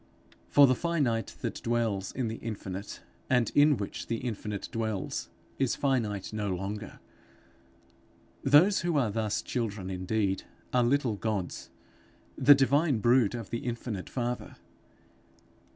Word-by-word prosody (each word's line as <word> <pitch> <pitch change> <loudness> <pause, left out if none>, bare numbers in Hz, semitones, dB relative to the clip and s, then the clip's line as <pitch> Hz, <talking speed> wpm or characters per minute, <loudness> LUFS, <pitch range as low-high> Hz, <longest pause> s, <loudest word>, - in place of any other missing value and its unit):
For 145 - +7
the 130 - +4
finite 135 -7 -1
that - - -4
dwells 115 -5 -1
in 125 -3 -2
the 110 +1 -4
infinite 100 -3 -6 0.3
and 125 -4 +2
in 145 -1 +5
which 100 -1 -5
the 115 - -1
infinite 105 -4 -4
dwells, 110 -4 -3 0.3
is 135 -3 +1
finite 110 -8 -1
no 105 -2 -2
longer. 100 +3 -5 1.4
Those 155 +9 +6
who 170 -3 0
are 120 -7 +2
thus 110 -1 -1
children 105 -6 -3
indeed, 95 +1 -1 0.3
are 125 -1 +4
little 120 -3 +1
Gods, 105 -4 -3 0.7
the 140 +2 +7
divine 140 +1 +3
brood 120 0 +3
of 115 -4 -7
the 115 - -1
infinite 120 -5 -4
Father. 120 -1 -3
115 Hz, 130 wpm, -29 LUFS, 105-130 Hz, 1.4 s, For